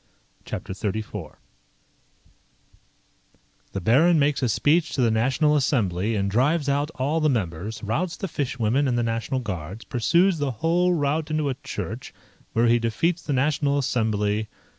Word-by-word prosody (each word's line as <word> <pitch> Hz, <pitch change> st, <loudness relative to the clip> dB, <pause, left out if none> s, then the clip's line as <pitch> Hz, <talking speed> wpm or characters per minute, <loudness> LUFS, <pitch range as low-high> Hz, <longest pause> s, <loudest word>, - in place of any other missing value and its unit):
CHAPTER -, -, -5 dB
XXXIV 105 Hz, -3 st, -4 dB, 2.4 s
_The 95 Hz, -, -3 dB
Baron 160 Hz, -, +5 dB
makes 145 Hz, -1 st, +2 dB
a 125 Hz, -, +1 dB
speech 155 Hz, +8 st, +2 dB
to 135 Hz, -, 0 dB
the 115 Hz, -, +3 dB
National 135 Hz, +7 st, +2 dB
Assembly, 110 Hz, -, +1 dB
and 100 Hz, -1 st, 0 dB
drives 140 Hz, +9 st, +1 dB
out 140 Hz, +1 st, +1 dB
all 145 Hz, +4 st, 0 dB
the 155 Hz, -1 st, +2 dB
members 105 Hz, -, -3 dB
Routs 160 Hz, -, -2 dB
the 195 Hz, -, -3 dB
fishwomen 135 Hz, -3 st, 0 dB
and 120 Hz, -2 st, +1 dB
the 120 Hz, -, +1 dB
National 115 Hz, +3 st, -2 dB
Guards 95 Hz, -1 st, -6 dB
Pursues 170 Hz, -, +2 dB
the 145 Hz, -1 st, 0 dB, 0.2 s
whole 175 Hz, +2 st, +3 dB
rout 150 Hz, +1 st, 0 dB
into 155 Hz, -2 st, 0 dB
a -, -, 0 dB
Church, 110 Hz, -2 st, -7 dB, 0.4 s
where 115 Hz, +1 st, +3 dB
he 120 Hz, 0 st, +4 dB
defeats 160 Hz, +10 st, 0 dB
the 145 Hz, -, -3 dB
National 140 Hz, +1 st, +1 dB
Assembly, 110 Hz, -5 st, 0 dB
&c. -, -, -29 dB
130 Hz, 155 wpm, -24 LUFS, 110-150 Hz, 2.4 s, Baron